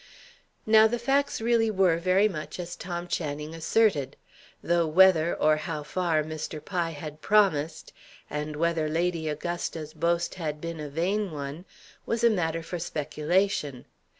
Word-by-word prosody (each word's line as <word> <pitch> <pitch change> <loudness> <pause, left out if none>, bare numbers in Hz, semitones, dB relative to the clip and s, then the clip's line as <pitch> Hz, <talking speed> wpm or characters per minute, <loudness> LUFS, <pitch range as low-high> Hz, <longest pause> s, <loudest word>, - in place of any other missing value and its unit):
Now 220 0 +7
the 240 +2 -1
facts 275 +4 +1
really 230 -1 +2
were 190 -5 +3
very 185 +4 +3
much 165 -3 -6
as 175 0 -5
Tom 175 0 -5
Channing 150 -2 -3
asserted; 165 -2 +1 0.5
though 170 -1 +2
whether, 170 0 +5
or 155 0 +3
how 155 -1 -4
far, 160 0 0
Mr. 155 0 -5
Pye 175 0 -2
had 155 0 -8
promised, 165 -7 +2 0.3
and 150 0 -4
whether 165 0 0
Lady 165 0 -1
Augusta's 155 0 -4
boast 170 +2 0
had 150 -2 -3
been 165 0 -5
a 150 -1 -5
vain 190 +7 -1
one, 145 +2 -6 0.4
was 230 0 -1
a 235 - +6
matter 165 -4 -1
for 170 +1 -5
speculation. 155 -2 -1
170 Hz, 150 wpm, -27 LUFS, 155-185 Hz, 0.5 s, Now